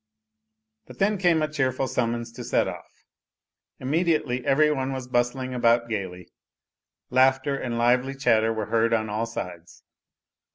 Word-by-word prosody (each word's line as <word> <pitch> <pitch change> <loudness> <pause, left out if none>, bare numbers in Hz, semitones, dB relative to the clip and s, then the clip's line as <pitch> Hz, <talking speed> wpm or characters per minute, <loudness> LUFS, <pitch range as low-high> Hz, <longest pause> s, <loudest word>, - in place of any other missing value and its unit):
But - - -13
then 200 0 +1
came 170 -4 +3
a - - +1
cheerful 135 -3 -1
summons 115 -1 -2
to - - -9
set - - +1
off; - - -8 0.9
immediately 150 -3 0
every 150 +4 +3
one 135 -2 -2
was 130 -1 -6
bustling 125 +1 -1
about 120 -1 +2
gaily; 95 -5 -5 0.8
laughter 130 +2 +3
and 120 -3 -3
lively 125 +3 +2
chatter 115 -4 +2
were 110 -1 -3
heard 115 +1 +1
on 110 -1 -2
all 110 +2 -1
sides. 85 -7 -8
125 Hz, 140 wpm, -25 LUFS, 115-135 Hz, 0.9 s, came